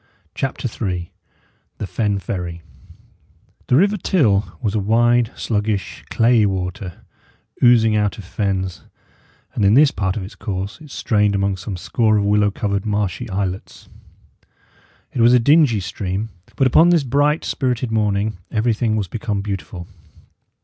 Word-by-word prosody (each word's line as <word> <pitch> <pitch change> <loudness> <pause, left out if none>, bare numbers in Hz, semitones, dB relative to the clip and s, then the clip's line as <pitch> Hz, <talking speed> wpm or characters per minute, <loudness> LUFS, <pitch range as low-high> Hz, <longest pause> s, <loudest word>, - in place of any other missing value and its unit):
CHAPTER 135 -1 -3
III 90 -7 -4 0.6
THE - - -4
FEN 105 0 -1
FERRY 85 -3 -5 1.0
The 125 - +3
river 200 +8 +3
Till 120 - +1
was 110 -6 -2
a 110 - +1
wide, 120 +3 +3
sluggish, 105 -2 -2
clayey 115 -2 +3
water, 95 -1 -5 0.6
oozing 115 -3 +5
out 105 +1 0
of 105 - -8
fens, 95 -3 -3 0.7
and - - -1
in 100 +3 +5
this 145 +1 +6
part 95 -1 -2
of 100 - -4
its 95 - -9
course 100 - -5
it 155 - -12
strained 105 -5 +1
among 100 0 0
some 95 +1 -6
score 110 +3 +1
of 100 - +1
willow 105 0 +3
covered, 100 -1 -2
marshy 105 -3 -2
islets. 95 -1 -4 1.2
It 120 - -1
was 120 +1 +6
a - - +5
dingy 140 -3 +4
stream; 95 +4 -4 0.3
but 135 - +2
upon 160 +7 +5
this 170 -4 +3
bright, 145 +4 +1
spirited 125 -3 -1
morning 105 -2 0
everything 110 0 0
was 105 -3 -1
become 105 0 -3
beautiful. 95 -3 -5
105 Hz, 145 wpm, -20 LUFS, 100-120 Hz, 1.2 s, this